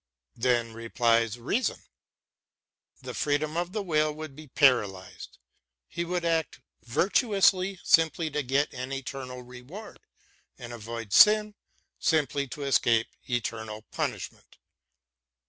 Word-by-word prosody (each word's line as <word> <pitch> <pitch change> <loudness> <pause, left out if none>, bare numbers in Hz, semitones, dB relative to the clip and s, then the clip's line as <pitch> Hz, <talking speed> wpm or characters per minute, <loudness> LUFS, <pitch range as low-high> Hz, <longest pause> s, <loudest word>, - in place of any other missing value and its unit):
Then 120 -1 +1
replies 115 0 +1
Reason: 170 - -1 0.7
" - - -37
The - - -6
freedom 150 +1 0
of 175 +1 -1
the 210 0 -3
will 155 -4 +1
would 155 -2 -8
be 155 +1 -11
paralysed; 110 -9 +1 0.5
he 170 - -3
would 175 0 -2
act 165 -4 0 0.2
virtuously 190 - +2
simply 160 0 +3
to 150 - -1
get 140 +3 0
an 130 +1 -6
eternal 130 -2 -6
reward, 125 - -11 0.6
and 120 -1 -8
avoid 115 -2 -6
sin 210 0 +6 0.5
simply 140 -3 +1
to 145 +3 -7
escape 120 -4 +2 0.2
eternal 110 -3 -3
punishment." - - -5
140 Hz, 115 wpm, -28 LUFS, 120-165 Hz, 0.7 s, sin